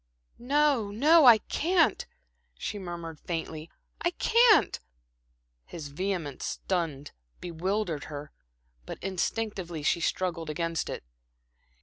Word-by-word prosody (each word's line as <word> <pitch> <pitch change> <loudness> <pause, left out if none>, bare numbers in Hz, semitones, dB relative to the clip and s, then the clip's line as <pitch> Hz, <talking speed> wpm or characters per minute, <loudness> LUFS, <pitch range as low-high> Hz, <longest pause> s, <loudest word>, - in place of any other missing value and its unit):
"No, 275 -3 +2
no, 295 +9 +5
I 235 -3 +10
can't," 325 - +1 0.5
she 205 - -4
murmured 170 -4 -7
faintly. 160 -1 -5 0.3
"I 345 - +2
can't." 460 +4 +4 0.9
His 155 -4 -7
vehemence 165 -3 -3
stunned, 160 -7 -3 0.3
bewildered 175 -1 -2
her; 145 0 -8 0.6
but - - -6
instinctively 190 -3 -3
she 170 - +2
struggled 170 -2 -1
against 165 +1 -2
it. - - -5
180 Hz, 100 wpm, -28 LUFS, 165-225 Hz, 0.9 s, I